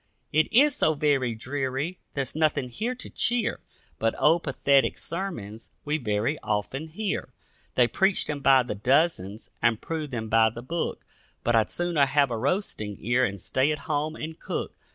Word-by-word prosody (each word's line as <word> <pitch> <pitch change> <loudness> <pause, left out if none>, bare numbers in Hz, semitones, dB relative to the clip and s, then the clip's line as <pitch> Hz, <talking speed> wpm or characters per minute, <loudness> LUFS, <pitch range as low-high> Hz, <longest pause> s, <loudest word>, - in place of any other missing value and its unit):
It 155 +1 +3
is 285 +4 +5
so 155 - +2
very 135 -5 +1
dreary, 135 +7 -3 0.2
there's 135 -2 -2
nothing 150 -4 +1
here 225 - -3
to 250 - -8
cheer, 235 -2 0 0.4
But 115 0 +1
old 165 +3 +4
pathetic 140 -1 +2
sermons 135 - -4 0.2
we 150 +2 0
very 110 +4 -1
often 110 +9 -2
hear; 195 +6 -3 0.5
They 125 -1 +5
preach 190 - +2
them 150 -1 -3
by 135 -2 +5
the 120 - -4
dozens 115 - 0
and 115 -2 +3
prove 160 -2 -4
them 115 -4 -4
by 110 0 +4
the 115 +2 -9
book, 170 +6 -3 0.4
But 120 - +2
I'd 110 -2 +3
sooner 170 -5 +2
have 140 -1 +2
a 115 - -1
roasting 110 - -2
ear 120 +3 +1
and 100 -3 -4
stay 130 - +1
at 150 - -1
home 155 +1 -1
and 160 0 -7
cook. - - -4
140 Hz, 175 wpm, -26 LUFS, 115-160 Hz, 0.5 s, is